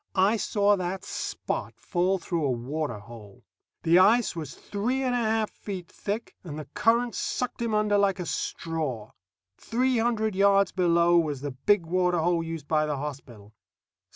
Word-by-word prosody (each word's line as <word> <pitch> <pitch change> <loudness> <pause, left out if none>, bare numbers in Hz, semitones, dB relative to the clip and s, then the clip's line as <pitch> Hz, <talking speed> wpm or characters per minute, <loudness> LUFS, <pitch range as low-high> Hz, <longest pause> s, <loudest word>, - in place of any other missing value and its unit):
I 195 +3 +4
saw 205 -1 +2
that 185 +1 -3
Spot - - -4
fall 185 +1 0
through 170 -2 -2
a 140 - +1
water 130 +1 -2
hole. 105 -1 -13 0.4
The 170 +2 +5
ice 220 +2 +4
was 155 -2 -6
three 245 +6 -2
and 255 -1 0
a - - +2
half 220 -1 0
feet 185 -4 -7
thick, 210 +3 -4
and 155 -5 -7
the 155 - -6
current 230 - +1
sucked 250 -1 -3
him 230 -2 0
under 210 -1 +2
like 195 -1 +2
a 180 - -3
straw. 150 -12 -3 0.5
Three 250 +1 +1
hundred 220 -2 +1
yards 195 0 +4
below 170 -1 +4
was 150 -5 -2
the 145 0 -3
big 170 +8 +2
water 180 +1 +1
hole 170 0 +1
used 165 -2 -6
by 155 0 +2
the 150 -2 -2
hospital. 130 -7 -8
180 Hz, 170 wpm, -27 LUFS, 155-210 Hz, 0.5 s, The